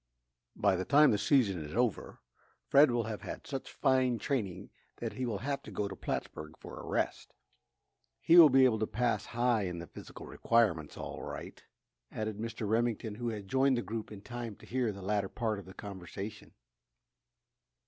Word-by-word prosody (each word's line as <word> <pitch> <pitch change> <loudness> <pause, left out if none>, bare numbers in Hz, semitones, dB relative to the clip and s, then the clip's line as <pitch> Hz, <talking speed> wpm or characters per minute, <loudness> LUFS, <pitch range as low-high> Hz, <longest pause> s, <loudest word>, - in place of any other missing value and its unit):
"By 100 -2 +3
the 95 - -1
time 145 +4 +6
the 105 - +1
season 105 - +2
is 75 +5 -8
over, 120 -3 -1 0.4
Fred 140 +1 +6
will 120 -1 +1
have 110 -1 -5
had - - -7
such 135 -2 -5
fine 130 -3 +2
training 110 -10 -3 0.3
that - - -4
he 130 -1 -3
will 110 -4 -1
have 140 -1 -1
to - - -11
go 105 - -2
to 95 - -7
Plattsburg 75 -3 -5
for - - -10
a - - -9
rest. - - -2 0.8
He 165 - +4
will 165 -3 +11
be 130 0 +6
able 110 -4 +3
to 110 - 0
pass 110 -1 0
high 120 -3 +1
in 90 -1 -4
the 85 - -6
physical - - -11
requirements, 95 -11 +1
all - - -6
right," - - -7 0.5
added 110 -1 -4
Mr. 115 -1 -4
Remington, 115 0 0
who 120 +2 -3
had 105 -3 -6
joined 130 +2 +3
the 120 - -1
group 110 +3 -5
in 100 -1 -9
time 120 -3 -6
to - - -16
hear 125 -2 0
the 100 -1 -9
latter 100 0 0
part 110 -3 -2
of 100 - -11
the 95 - -11
conversation. 100 +2 -8
110 Hz, 190 wpm, -32 LUFS, 100-125 Hz, 0.8 s, will